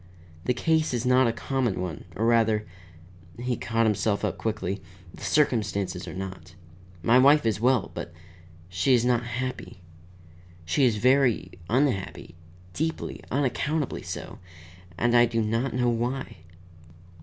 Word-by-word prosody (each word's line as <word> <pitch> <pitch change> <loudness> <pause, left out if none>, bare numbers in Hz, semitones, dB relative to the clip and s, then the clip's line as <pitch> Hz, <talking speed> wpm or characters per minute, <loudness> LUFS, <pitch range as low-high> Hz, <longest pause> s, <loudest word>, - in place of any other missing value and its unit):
"The 125 - +2
case 160 0 +1
is 120 +1 -2
not 125 0 +4
a - - +2
common 125 -5 -1
one, 90 -5 -5
or, 110 - 0
rather," 110 -2 +3 0.7
he 125 +1 -2
caught 115 +1 0
himself 105 -1 +1
up - - -3
quickly, 100 -3 -2 0.3
"the - - -12
circumstances 100 -10 0
are - - -7
not. 95 -3 -7 0.5
My 120 +8 +5
wife 145 +2 +6
is 110 -2 0
well, 125 -3 +2
but 85 - -6 0.6
she 90 +8 +2
is 120 0 +1
not 120 -1 +2
happy. 120 -6 -5 0.8
She 85 - +2
is 120 -4 +3
very 125 -5 +2 0.2
unhappy, 115 -9 0 0.4
deeply, 160 - -3
unaccountably 145 +2 -1
so, - - -7 0.6
and 120 0 +2
I 120 0 +6
do 115 0 -1
not 115 +4 -1
know 125 -1 +2
why." 120 0 -2
120 Hz, 140 wpm, -26 LUFS, 105-130 Hz, 0.8 s, wife